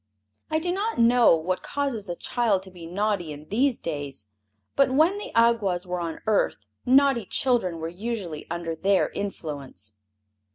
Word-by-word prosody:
I 315 - +1
do 350 +3 -1
not 420 +4 -2
know 235 -4 +6
what 175 +3 -2
causes 255 -9 -3
a 175 - -2
child 215 -2 0
to 190 - -12
be 175 -2 -10
naughty 195 -2 -1
in 150 +1 -9
these 245 +5 +1
days, 145 -8 -5 0.5
but 275 -1 +4
when 320 +9 +3
the - - -7
Awgwas 225 -6 +3
were 180 0 -3
on 165 -2 -4
earth 215 -2 +1 0.2
naughty 265 -4 +4
children 235 -10 +1
were 160 0 -4
usually 180 -4 -5
under 170 -1 -3
their 195 +4 +2
influence. 140 - -6
200 Hz, 160 wpm, -25 LUFS, 165-245 Hz, 0.5 s, know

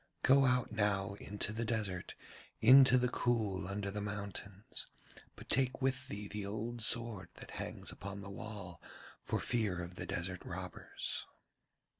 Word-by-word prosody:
Go 135 +1 +7
out 125 -1 +3
now 100 -2 +1
into 105 +1 -1
the 115 +1 -1
desert, 105 -5 -2 0.4
into 130 +2 +9
the 125 0 +3
cool 110 -7 0
under 100 0 -2
the 105 +1 -3
mountains, 100 -1 -5 0.5
but - - -12
take 130 -1 +2
with 130 -1 0
thee 105 -3 -5
the 105 0 -4
old 110 +4 -3
sword 110 -5 +1
that - - -10
hangs - - -5
upon 100 +1 -6
the 100 0 -7
wall 100 -5 -7 0.4
for - - -1
fear 105 -7 0
of 85 0 -5
the - - -4
desert 90 -1 -2
robbers.' - - -4
105 Hz, 150 wpm, -35 LUFS, 100-120 Hz, 0.5 s, into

